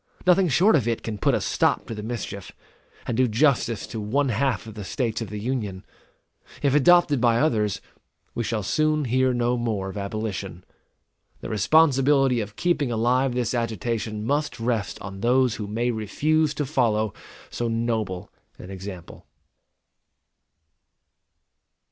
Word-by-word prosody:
Nothing 185 +1 +5
short 175 +9 +4
of 125 -7 +1
it 115 -1 -1
can 105 -2 -5
put - - +2
a - - +1
stop - - +1
to - - -6
the 105 - -6
mischief, 110 -3 -6 0.5
and 120 - -2
do 130 +1 +3
justice 120 -1 +1
to 110 - -6
one 135 +7 0
half 120 0 0
of 110 - -9
the 105 -1 -7
States 115 +2 -2
of 115 - -5
the 105 - -5
Union. 105 -5 -3 0.8
If 140 -2 +3
adopted 150 -2 +5
by 120 -2 +4
others, 110 -8 +1 0.5
we 120 - -2
shall 110 -1 -2
soon 155 +6 +1
hear 130 +1 +2
no 120 0 0
more 110 -5 -2
of 95 - -8
abolition. 100 -3 -4 0.8
The - - -6
responsibility 135 - +3
of 105 0 -7
keeping 165 -7 0
alive 125 +3 +1
this 125 -3 -1
agitation 110 -2 -2
must 145 +2 -1
rest 115 -3 -2
on 95 -1 -7
those 125 +2 +2
who 105 - -5
may 115 +4 -1
refuse 150 +8 0
to 145 - -1
follow 110 -7 +1 0.4
so 120 - -2
noble 110 -5 -2 0.3
an 90 - -10
example. 95 -2 -9
115 Hz, 150 wpm, -24 LUFS, 105-135 Hz, 0.8 s, Nothing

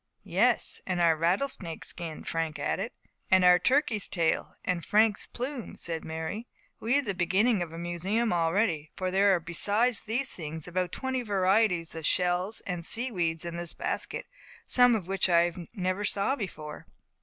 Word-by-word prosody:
"Yes; - - +2
and 185 -1 -1
our 165 -2 +4
rattlesnake's 175 - -1
skin," 165 -3 -6
Frank 165 -2 -2
added. 195 - -2 0.4
"And 185 -1 +5
our 180 0 +7
turkey's 255 -7 +1
tail, 165 -3 0
and 180 -2 -1
Frank's 210 +4 +2
plume," 250 -1 -5
said 165 -1 -4
Mary. 160 +9 -5 0.3
"We 235 +4 +1
have 285 -1 +2
the 200 - -1
beginning 190 +4 +2
of 170 -2 -3
a 165 - -8
museum 180 +6 -1
already; 165 -2 +1
for 185 -1 -2
there 195 +1 +4
are - - 0
besides 205 +8 +1
these 245 +5 -1
things 160 -1 -5
about 180 0 -1
twenty 260 -1 -2
varieties 195 -4 +2
of 160 -2 -1
shells 180 +3 +1
and 175 -3 -4
sea 240 +8 -1
weeds 165 -4 -1
in 170 0 -5
this 175 -1 -3
basket, - - -3 0.4
some 245 -1 +5
of 190 -6 -3
which 195 0 +1
I 170 0 +4 0.2
never 185 -1 -2
saw 200 +6 +1
before." 155 - -7
185 Hz, 165 wpm, -29 LUFS, 170-220 Hz, 0.4 s, our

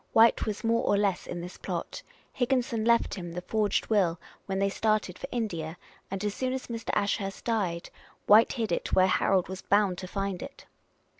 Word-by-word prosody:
White 225 0 +5
was 210 +1 -3
more 230 0 +2
or 205 - +3
less 200 -3 0
in 175 - -5
this 180 +1 -8
plot; - - -4 0.3
Higginson 245 -3 0
left 235 +1 +3
him 175 -3 -6
the 180 - -4
forged 210 +2 0
will 185 -6 +2 0.3
when 190 0 -2
they 195 +1 +2
started 210 -2 0
for - - -5
India; 175 -9 -3 0.3
and, 195 +1 -3
as 205 - -1
soon 255 +2 -2
as 260 - -4
Mr. 230 -1 -6
Ashurst 200 -1 -1
died. 190 -7 -1 0.3
White 215 +2 +6
hid 225 -6 -2
it - - -2
where 185 - +6
Harold 185 0 +2
was 190 0 -6
bound 200 -3 +2
to 185 - -6
find 195 -1 -3
it." 275 0 -9
200 Hz, 195 wpm, -28 LUFS, 185-225 Hz, 0.3 s, White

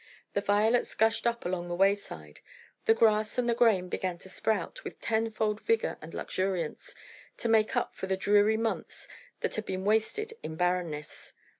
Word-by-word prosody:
The 200 - +1
violets 215 +4 +2
gushed 225 +1 +2
up 235 0 -1
along 175 -1 -2
the 175 - -3
wayside. 190 - 0 0.5
The 225 - +5
grass 215 0 +3
and 245 -1 +1
the 235 - +3
grain 220 -6 +3
began 180 -1 -3
to 190 - -12
sprout 220 - -2
with - - -8
tenfold 220 -1 0
vigour 455 0 0
and - - -9
luxuriance, 185 - -3 0.4
to - - -2
make 220 -1 +3
up - - 0
for 190 - -5
the 190 0 0
dreary 205 +2 +4
months 225 0 -3 0.3
that - - -1
had 220 - -2
been 190 0 -3
wasted 220 - +1
in 160 - -6
barrenness. 175 -4 -2
210 Hz, 170 wpm, -29 LUFS, 185-225 Hz, 0.5 s, The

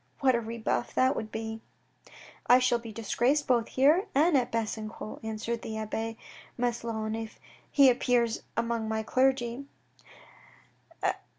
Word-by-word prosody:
What 265 -2 +4
a 235 - +1
rebuff 230 +1 -2
that 260 +1 +3
would 215 0 -5
be? 220 0 -5 0.4
" - - -21 0.3
I 245 - +8
shall 250 -2 +2
be 230 -1 -9
disgraced 240 +6 +1
both 240 -3 +2
here 305 +10 +3
and 315 +3 +4
at 250 -2 +2
Besancon," 220 -1 -4
answered 220 +1 -3
the 220 -1 -5
abbe 225 +1 -3 0.4
Maslon 230 -3 -2
if 225 -1 -6 0.3
he 280 -2 +6
appears 240 -2 +2 0.2
among 230 -1 -1
my 220 0 -1
clergy. 260 +1 +1
235 Hz, 135 wpm, -29 LUFS, 220-255 Hz, 0.4 s, I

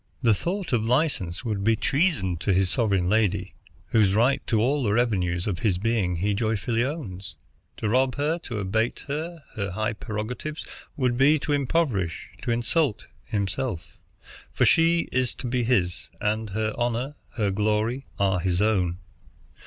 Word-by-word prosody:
The 115 -2 +5
thought 175 - -3
of 115 -3 +2
license 120 - 0
would 105 -4 -1
be 110 +2 +4
treasop 135 - +1
to 95 - +1
his 95 0 +2
sovereign 100 -7 +1
lady, 100 -2 +1 0.4
whose 105 -4 +3
right 120 +5 +3
to 115 -3 +2
all 140 +6 +2
the 105 -5 +1
revenues 95 -7 +1
of 95 -5 -2
his 95 -4 +1
being 100 -3 0
he 100 +5 0
joyfully 115 +2 0
owns. 100 - -5 0.4
To 110 - -2
rob 130 +3 +2
her, 150 +4 0
to 120 - -4
abate 110 +4 -1
her 160 +3 -4
high 100 +1 -2
prerogatives, 115 +8 -5 0.3
would 125 -3 +1
be 145 +4 +6
to 145 - -1
impoverish, 135 - 0
to - - -4
insult, 120 +2 +1 0.2
himself; 100 -1 -3 0.5
for - - +2
she 165 +1 +4
is 130 -1 0
to - - -8
be 125 0 0
his, 95 -8 0
and 110 +1 -1
her 110 +2 -1
honor, 120 +4 -1 0.2
her 105 -4 +1
glory, 110 +6 0
are 95 -2 +2
his 90 0 0
own. 95 -5 +2
110 Hz, 160 wpm, -25 LUFS, 100-130 Hz, 0.5 s, be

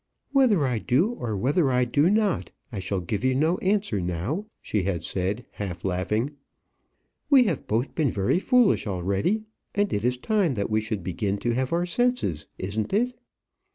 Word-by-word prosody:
"Whether 245 - +4
I 125 -4 0
do, 140 - +2
or 115 - -3
whether 140 - +2
I 125 -1 +2
do 145 +7 +3
not, 210 -3 +1 0.2
I 105 - -4
shall 95 0 -2
give 100 +5 -3
you 130 0 +2
no 160 +6 +2
answer 195 - 0
now," 90 - -2
she 105 - -1
had 90 -3 -2
said, 100 +7 -2
half 90 -4 -6
laughing. 105 +8 0 1.0
"We 275 -4 +7
have 180 - -2
both 115 +5 0
been 155 -4 +1
very 100 - +1
foolish 245 - +3
already, 100 - 0 0.3
and 205 0 +1
it 100 - -1
is 125 +1 +1
time 195 - +1
that 100 +1 -2
we 110 0 +2
should 110 -4 -4
begin 95 +3 -1
to 120 - +3
have 130 +1 -1
our 170 +1 +1
senses. 180 - 0
Isn't 105 +3 -3
it?" 245 +4 +1
125 Hz, 180 wpm, -26 LUFS, -, 1.0 s, We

